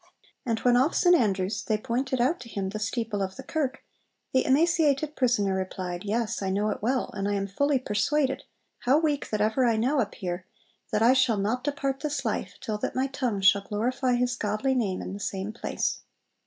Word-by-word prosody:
And 230 Hz, -1 st, +1 dB
when 245 Hz, -1 st, +4 dB
off 270 Hz, +6 st, +2 dB
St 355 Hz, -1 st, +5 dB
Andrews 195 Hz, -, +1 dB
they 215 Hz, -, 0 dB
pointed 255 Hz, +3 st, -2 dB
out 265 Hz, +8 st, +2 dB
to 240 Hz, -1 st, -10 dB
him 195 Hz, -3 st, -3 dB
the 215 Hz, +2 st, -5 dB
steeple 215 Hz, -1 st, -2 dB
of 190 Hz, 0 st, -3 dB
the -, -, -8 dB
kirk, 290 Hz, -5 st, -2 dB, 0.5 s
the 260 Hz, -, +4 dB
emaciated 305 Hz, 0 st, +3 dB
prisoner 235 Hz, -7 st, +2 dB
replied, 185 Hz, -1 st, -3 dB
'Yes, 215 Hz, +1 st, -1 dB
I 190 Hz, -, -1 dB
know 205 Hz, +3 st, +1 dB
it -, -, -5 dB
well: 250 Hz, +4 st, 0 dB
and 200 Hz, -1 st, -2 dB
I 205 Hz, -, 0 dB
am 195 Hz, 0 st, -1 dB
fully 280 Hz, +9 st, +1 dB
persuaded, 265 Hz, +4 st, 0 dB, 0.4 s
how 260 Hz, +4 st, +3 dB
weak 300 Hz, -3 st, 0 dB
that 215 Hz, -1 st, -1 dB
ever 220 Hz, +5 st, +2 dB
I 235 Hz, -2 st, +3 dB
now 265 Hz, +6 st, +2 dB
appear, 185 Hz, -5 st, -3 dB, 0.4 s
that 215 Hz, +1 st, +2 dB
I 240 Hz, +3 st, +7 dB
shall 255 Hz, -4 st, +3 dB
not 220 Hz, +6 st, -1 dB
depart 275 Hz, -2 st, -1 dB
this 290 Hz, -3 st, -3 dB
life 195 Hz, -4 st, -2 dB
till 215 Hz, -1 st, -3 dB
that -, -, -3 dB
my 260 Hz, +1 st, +1 dB
tongue 250 Hz, -7 st, -2 dB
shall 200 Hz, +1 st, +5 dB
glorify 245 Hz, +5 st, 0 dB
His 245 Hz, 0 st, +1 dB
godly 215 Hz, +4 st, 0 dB
name 210 Hz, -8 st, -1 dB
in -, -, -6 dB
the 200 Hz, -, -6 dB
same 200 Hz, +1 st, -3 dB
place.' 235 Hz, -, -2 dB
235 Hz, 205 wpm, -27 LUFS, 205-265 Hz, 0.5 s, I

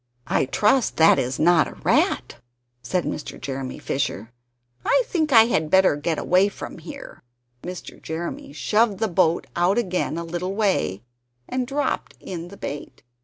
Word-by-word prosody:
"I -, -, +1 dB
trust 215 Hz, -, +2 dB
that 160 Hz, 0 st, +6 dB
is 130 Hz, +1 st, -1 dB
not 165 Hz, 0 st, +4 dB
a -, -, -10 dB
rat," -, -, +1 dB, 0.4 s
said 180 Hz, +5 st, -1 dB
Mr. -, -, -5 dB
Jeremy 135 Hz, -1 st, -5 dB
Fisher; 120 Hz, -5 st, -3 dB, 0.5 s
"I -, -, +3 dB
think 320 Hz, -9 st, -1 dB
I 225 Hz, -3 st, +9 dB
had 160 Hz, -10 st, 0 dB
better 190 Hz, -3 st, +5 dB
get 155 Hz, +2 st, -2 dB
away 185 Hz, +3 st, +3 dB
from 195 Hz, -, -8 dB
here." 165 Hz, -, -10 dB, 0.4 s
Mr. 180 Hz, 0 st, -8 dB
Jeremy 160 Hz, -2 st, -5 dB
shoved 210 Hz, +8 st, +1 dB
the 220 Hz, -, 0 dB
boat 170 Hz, -3 st, +2 dB
out 175 Hz, +5 st, +2 dB
again 185 Hz, -7 st, -1 dB
a 170 Hz, -, -3 dB
little 175 Hz, +3 st, -4 dB
way, 190 Hz, -, 0 dB, 0.4 s
and 255 Hz, -1 st, -2 dB
dropped 285 Hz, +2 st, -2 dB
in 175 Hz, -2 st, -6 dB
the 200 Hz, +3 st, -12 dB
bait. 145 Hz, +1 st, -7 dB
175 Hz, 160 wpm, -23 LUFS, 155-210 Hz, 0.5 s, I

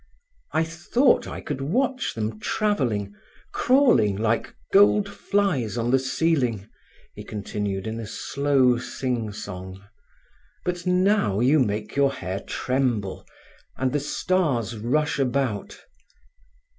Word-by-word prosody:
"I 160 Hz, -, +2 dB
thought 175 Hz, -, +2 dB
I -, -, -6 dB
could 145 Hz, -3 st, -4 dB
watch 255 Hz, -, 0 dB
them 110 Hz, -1 st, -3 dB
travelling, 120 Hz, -, -1 dB, 0.4 s
crawling 240 Hz, -, +4 dB
like 115 Hz, +2 st, -1 dB, 0.2 s
gold 205 Hz, +1 st, +5 dB
flies 195 Hz, -, -1 dB
on 120 Hz, +1 st, 0 dB
the 135 Hz, -, +4 dB
ceiling," 130 Hz, -6 st, 0 dB, 0.5 s
he -, -, -9 dB
continued 100 Hz, -1 st, -4 dB
in 110 Hz, +1 st, -4 dB
a 110 Hz, -, -6 dB
slow 135 Hz, 0 st, +1 dB
sing 120 Hz, -3 st, -3 dB
song. 95 Hz, -2 st, -8 dB, 0.9 s
"But 180 Hz, 0 st, -3 dB
now 180 Hz, -, +2 dB
you 135 Hz, +6 st, +4 dB
make 105 Hz, -3 st, -1 dB
your 140 Hz, -1 st, +3 dB
hair 95 Hz, -2 st, -4 dB
tremble, 120 Hz, -6 st, -2 dB, 0.5 s
and 130 Hz, -1 st, 0 dB
the 145 Hz, -, +2 dB
stars 145 Hz, -, 0 dB
rush 145 Hz, +8 st, 0 dB
about." 125 Hz, -5 st, -1 dB
130 Hz, 120 wpm, -24 LUFS, 110-165 Hz, 0.9 s, gold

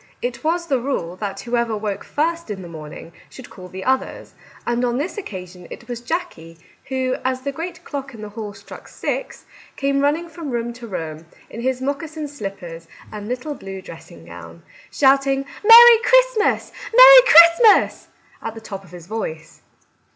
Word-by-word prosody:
It 240 Hz, -1 st, -5 dB
was 340 Hz, +2 st, -1 dB
the 275 Hz, -6 st, 0 dB
rule 235 Hz, -10 st, -4 dB
that 200 Hz, 0 st, -5 dB
who 245 Hz, 0 st, -3 dB
ever 235 Hz, -2 st, -1 dB
woke 205 Hz, -1 st, -4 dB
first 335 Hz, 0 st, -2 dB
in 195 Hz, -3 st, -6 dB
the -, -, -9 dB
morning 160 Hz, 0 st, -10 dB, 0.2 s
should 260 Hz, -, -13 dB
call 185 Hz, -2 st, -11 dB
the 190 Hz, +1 st, -8 dB
others, 265 Hz, 0 st, -2 dB, 0.3 s
and 240 Hz, +1 st, -1 dB
on 240 Hz, 0 st, 0 dB
this 300 Hz, +7 st, -3 dB
occasion 180 Hz, -, -9 dB
it -, -, -11 dB
was 240 Hz, -1 st, -6 dB
Jackie 165 Hz, -, -5 dB, 0.3 s
who, 260 Hz, -1 st, -2 dB
as 255 Hz, 0 st, -2 dB
the 280 Hz, +1 st, -4 dB
great 335 Hz, +4 st, -7 dB
clock 275 Hz, -3 st, -7 dB
in 215 Hz, -, -10 dB
the 210 Hz, -, -7 dB
hall 210 Hz, -1 st, -8 dB
struck 200 Hz, +1 st, -13 dB
six, -, -, -5 dB, 0.3 s
came 275 Hz, 0 st, 0 dB
running 300 Hz, +4 st, 0 dB
from 330 Hz, -3 st, -8 dB
room 235 Hz, -1 st, -3 dB
to 240 Hz, 0 st, -11 dB
room 160 Hz, -5 st, -7 dB, 0.2 s
in 230 Hz, -, -7 dB
his 260 Hz, +1 st, -2 dB
moccasin 300 Hz, +2 st, -4 dB
slippers 195 Hz, -, -8 dB, 0.2 s
and 210 Hz, -1 st, -8 dB
little 255 Hz, +5 st, -4 dB
blue 195 Hz, -7 st, -9 dB
dressing 165 Hz, -, -13 dB
gown, 85 Hz, -1 st, -12 dB, 0.3 s
shout 275 Hz, 0 st, +3 dB
ing 270 Hz, 0 st, 0 dB
" -, -, -18 dB
Merry 465 Hz, +1 st, +9 dB
Christmas, -, -, +2 dB, 0.2 s
Merry -, -, +10 dB
Christmas," 335 Hz, +3 st, +6 dB, 0.3 s
at 225 Hz, -, -6 dB
the -, -, -8 dB
top 195 Hz, -3 st, -9 dB
of 185 Hz, -, -18 dB
his 175 Hz, -1 st, -12 dB
voice. 165 Hz, -6 st, -7 dB
245 Hz, 180 wpm, -20 LUFS, 195-300 Hz, 0.3 s, Merry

